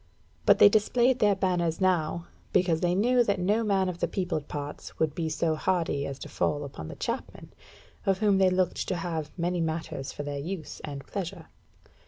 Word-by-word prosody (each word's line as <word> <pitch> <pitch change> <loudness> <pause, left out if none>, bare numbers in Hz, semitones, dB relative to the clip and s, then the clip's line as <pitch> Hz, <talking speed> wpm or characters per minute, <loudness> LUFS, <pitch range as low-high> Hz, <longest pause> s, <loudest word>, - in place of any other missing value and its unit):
But - - +7
they - - +9
displayed 240 +5 +3
their 205 -3 +4
banners 175 -4 0
now, 170 -3 +1 0.3
because 170 -3 +3
they 175 0 +2
knew 245 +5 +4
that 200 -4 0
no 205 +5 +2
man 195 -3 +2
of 180 -1 -4
the - - +1
peopled 175 -6 -2
parts 145 0 -6
would 155 -2 +1
be 160 0 -2
so 160 +1 0
hardy 160 -4 0
as 140 - -5
to - - -7
fall 145 0 -1
upon 130 - -7
the - - -7
Chapmen, - - -5 0.5
of 195 -1 +3
whom 205 -2 +3
they 190 -1 +5
looked 185 -1 0
to 185 - 0
have 165 -3 -3
many 175 0 0
matters 160 -4 -3
for 145 - -6
their 145 -1 -4
use 165 +1 -5
and 140 -2 -6
pleasure. 185 -4 -5
175 Hz, 195 wpm, -28 LUFS, 155-195 Hz, 0.5 s, they